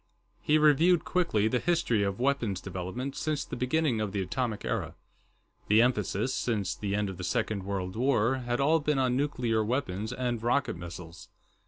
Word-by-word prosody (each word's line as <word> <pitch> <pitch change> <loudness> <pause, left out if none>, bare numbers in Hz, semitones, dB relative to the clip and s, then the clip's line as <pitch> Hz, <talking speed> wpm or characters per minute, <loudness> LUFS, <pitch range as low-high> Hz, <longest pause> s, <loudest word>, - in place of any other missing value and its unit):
He 150 - +3
reviewed, 155 +3 +4
quickly, 165 - +1
the 125 +3 +1
history 165 -10 +1
of 100 +1 -1
weapons 120 -8 0
development 95 +9 -5
since 155 -2 -2
the - - -6
beginning 125 -2 0
of 105 -2 -3
the 100 - -1
Atomic 110 +3 -3
Era. - - -2 0.7
The 110 +2 +5
emphasis, 115 0 0
since 105 -6 -1
the 100 -1 -3
end 105 0 0
of 95 -2 -6
the 95 - -6
Second 105 +1 -1
World 95 -2 -3
War, 125 0 +2
had 120 -1 -2
all 155 +4 +4
been 150 -1 0
on 130 -2 +2
nuclear 125 -6 0
weapons 110 -3 -2
and 125 -2 -2
rocket 125 +2 +1
missiles. 85 +1 -9
120 Hz, 175 wpm, -29 LUFS, 100-140 Hz, 0.7 s, The